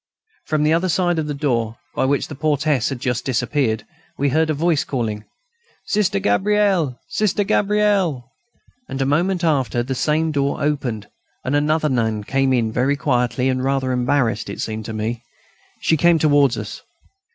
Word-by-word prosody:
From 155 -1 +1
the 155 +1 +3
other 175 +3 +1
side 175 -1 +1
of 155 - -2
the 145 - -3
door, 120 -6 -1 0.2
by - - 0
which 140 +1 0
the - - -8
portress 145 -2 +1
had 135 -3 -4
just 125 -1 -1
disappeared, 125 -3 0 0.3
we 140 +1 +1
heard 160 +3 +2
a - - +2
voice 160 -1 +1
calling: 110 -5 -3 0.6
"Sister 205 - +1
Gabrielle!... 185 - +1
Sister 210 -1 0
Gabrielle!..." 200 - +1 0.6
And 135 - -4
a 135 - +1
moment 175 +6 +1
after, 135 -6 +1
the 130 +2 -3
same 155 +4 +1
door 140 -1 0
opened, 135 -8 -2 0.4
and 130 - 0
another 155 +2 +2
nun 110 -5 0
came 135 +4 +1
in 115 -3 +1
very 130 +5 +1
quietly, 125 -2 0
and 130 -1 0
rather 135 -1 0
embarrassed, 125 -3 0
as - - -6
it - - -4
seemed 110 -1 -4
to 110 - -5
me. 110 +2 -3 0.6
She 160 - +2
came 170 +2 +4
towards 145 -4 +3
us. - - -6
140 Hz, 175 wpm, -20 LUFS, 125-160 Hz, 0.6 s, came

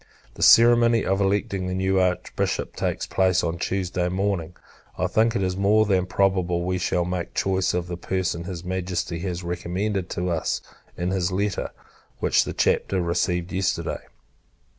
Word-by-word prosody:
The - - -11
ceremony 115 -1 +6
of 95 +1 +1
electing 100 -1 0
the 90 - -2
new 95 0 +1
Archbishop 90 -1 -1
takes - - -2
place 95 -1 +2
on 85 0 -2
Tuesday 90 -1 -1
morning. 90 -3 -2 0.4
I - - 0
think 115 +1 +2
it 95 -2 -1
more 105 +2 +4
than 95 -3 +1
probable, 90 -3 +1
we 90 +1 -1
shall 90 0 0
make 90 -1 -4
choice 95 -1 +1
of 90 -1 -1
the 90 -1 -5
person 90 -2 -2
his 90 -2 -6
Majesty 90 -2 -3
has 90 0 -4
recommended 90 +3 -2
to 90 0 -2
us, 80 -2 -1 0.4
in 90 +1 -1
his 95 -1 0
letter, 100 +2 -1 0.5
which - - +2
the - - -4
Chapter 95 - +1
received 90 0 -1
yesterday. 95 0 -1
95 Hz, 160 wpm, -24 LUFS, 90-95 Hz, 0.5 s, ceremony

